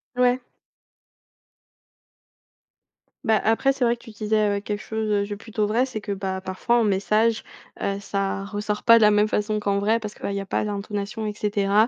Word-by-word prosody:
Ouais. 250 0 +3 2.8
Ben, 220 -4 +3
après, 225 +5 +3
c'est 270 -2 0
vrai 235 0 +3
que 235 - -21
tu 235 - -12
disais, 215 0 +1
heu, - - -2
quelque 205 +1 -4
chose, 220 -1 -3
heu, 205 -1 +2
de 205 0 -5
plutôt 220 0 -2
vrai, 225 +5 +2
c'est 235 -5 -6
que, 205 - -5
bah 190 -1 -3
parfois 185 +5 0
en - - +3
message, 215 +3 +2 0.4
heu, 195 0 -1
ça 195 -1 -2
ressort 210 +1 -3
pas 230 -1 +8
de - - +3
la 210 0 +6
même 210 +1 +3
façon 210 0 0
qu'en 200 -1 +1
vrai 220 +3 +1
parce 210 -1 -5
que, - - -18
bah 200 - -1
il - - -3
y 200 - -1
a - - -7
pas 195 - -1
d'intonation, 205 +1 -4
et 210 - -2
cetera 205 +1 +2
210 Hz, 205 wpm, -24 LUFS, 200-220 Hz, 2.8 s, pas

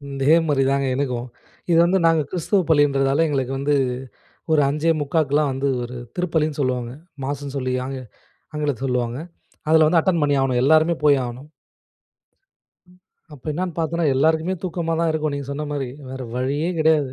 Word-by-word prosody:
இதே 135 +4 +4
மாதிரி 140 -2 +2
தாங்க 140 0 +1
எனக்கும். 125 -3 -2 0.4
இது 165 - +5
வந்து 190 +2 +2
நாங்க 165 -1 +4
கிறிஸ்துவ 185 +3 +1
பள்ளின்றதால 140 0 +3
எங்களுக்கு 135 -3 -1
வந்து, 145 +1 +1 0.8
ஒரு 155 -2 +4
5:45 155 0 0
க்கு 140 0 -7
எல்லாம் 150 -1 +3
வந்து 135 +1 -1 0.2
ஒரு 125 +1 -7 0.2
திருப்பலின்னு 160 -4 -1
சொலுவாங்க. 125 -2 -1 0.3
மாஸ்னு 140 0 -4
சொல்லி 130 -1 -2
ஆங்கி 135 -1 -5 0.5
ஆங்கிலத்தில 145 -4 -2
சொலுவாங்க. 125 -1 -1 0.5
அதில 160 -1 +6
வந்து 165 +1 +4
அட்டெண்ட் 170 -3 +1
பண்ணி 145 -1 +2
ஆகணும் 130 -2 +1
எல்லோருமே 160 +4 +4
போயாகணும். 135 -1 +1 1.8
அப்போ 135 - -15
என்னான்னு 175 +2 -3
பார்த்தேன்னா, 165 +1 0
எல்லாருக்குமே 160 +6 +2
தூக்கமா 170 -2 -2
தான் 165 -1 +2
இருக்கும். 155 -2 -1
நீங்க 140 -1 -5
சொன்ன 150 +2 -4
மாரி. 135 -3 -3 0.2
வேற 130 0 -6
வழியே 140 +6 -1
கிடையாது. 155 -4 +3
145 Hz, 155 wpm, -22 LUFS, 135-160 Hz, 1.8 s, அதில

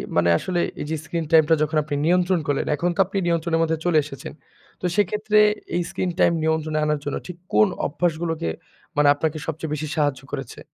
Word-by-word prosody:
মানে 85 0 +3
আসলে 180 - -2 0.2
এই - - -3
যে - - +1
স্ক্রিন 165 0 -3
টাইমটা 160 0 +6
যখন 155 +1 -1
আপনি 145 -1 -3
নিয়ন্ত্রণ 180 +1 +3
করলেন, 145 -1 0
এখন 170 +5 0
তো - - -12
আপনি 195 +2 -5
নিয়ন্ত্রণের 170 -1 +1
মধ্যে 160 0 0
চলে 175 -3 +3
এসেছেন। 140 -2 -8 0.5
তো - - -3
সেক্ষেত্রে 210 +1 +2 0.4
এই 175 - +2
স্ক্রিন 185 - -2
টাইম - - +5
নিয়ন্ত্রণে 160 -1 0
আনার 150 -1 0
জন্য 145 - -2
ঠিক 180 -2 -8 0.2
কোন 105 0 +6 0.2
অভ্যাসগুলোকে 165 - -1 0.5
মানে 145 0 +5
আপনাকে 155 +1 -2
সবচেয়ে 160 -1 -4
বেশি 155 +1 -3
সাহায্য 145 -4 0
করেছে? 135 -4 -6
160 Hz, 190 wpm, -23 LUFS, 150-175 Hz, 0.5 s, টাইমটা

